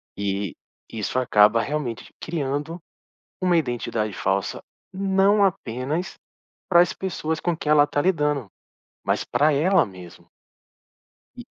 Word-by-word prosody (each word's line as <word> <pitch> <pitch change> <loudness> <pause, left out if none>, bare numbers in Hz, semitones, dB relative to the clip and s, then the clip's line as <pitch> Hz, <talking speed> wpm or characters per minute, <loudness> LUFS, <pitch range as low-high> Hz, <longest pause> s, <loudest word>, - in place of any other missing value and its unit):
E, 100 -1 -3 0.4
isso 110 +2 -3
acaba 110 -2 +4
realmente 140 -6 -4
criando 150 +1 -3 0.6
uma 180 -2 +3
identidade 120 -7 -1
falsa, 95 +1 -2 0.3
não 195 +2 +3
apenas 155 0 -2 0.6
para 175 -2 +7
as 175 - +1
pessoas 160 -4 -3
com 175 -2 -1
quem 150 - -1
ela 150 -1 +7
está 145 0 0
lidando, 150 - 0 0.6
mas - - 0
pra 150 +2 +2
ela 170 +7 +3
mesmo. 90 -3 -13 1.1
E - - -9
150 Hz, 120 wpm, -23 LUFS, 115-175 Hz, 1.1 s, para